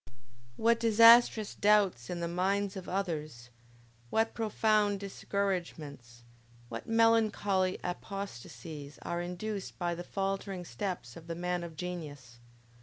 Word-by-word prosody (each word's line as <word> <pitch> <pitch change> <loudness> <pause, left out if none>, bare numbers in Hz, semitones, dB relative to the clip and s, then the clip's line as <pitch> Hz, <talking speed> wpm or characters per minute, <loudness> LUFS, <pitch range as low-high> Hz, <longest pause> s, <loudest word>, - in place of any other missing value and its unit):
What 230 +1 +3
disastrous 230 -1 +6
doubts 200 - +3
in 175 -1 -3
the 170 - -1
minds 195 +3 0
of 190 -2 -7
others, 155 -10 -3 0.6
what 225 - +1
profound 215 -2 +2
discouragements, 170 -11 -4 0.5
what 115 0 -6
melancholy 215 -4 +3
apostasies 160 - -6
are 170 0 -2
induced 190 +3 -5
by 175 -1 -1
the 175 +1 -6
faltering 195 -1 -3
steps 120 - -5
of 165 0 -12
the 165 - -4
man 180 0 -2
of 165 -2 -8
genius! 145 -8 -7
185 Hz, 115 wpm, -31 LUFS, 165-205 Hz, 0.6 s, disastrous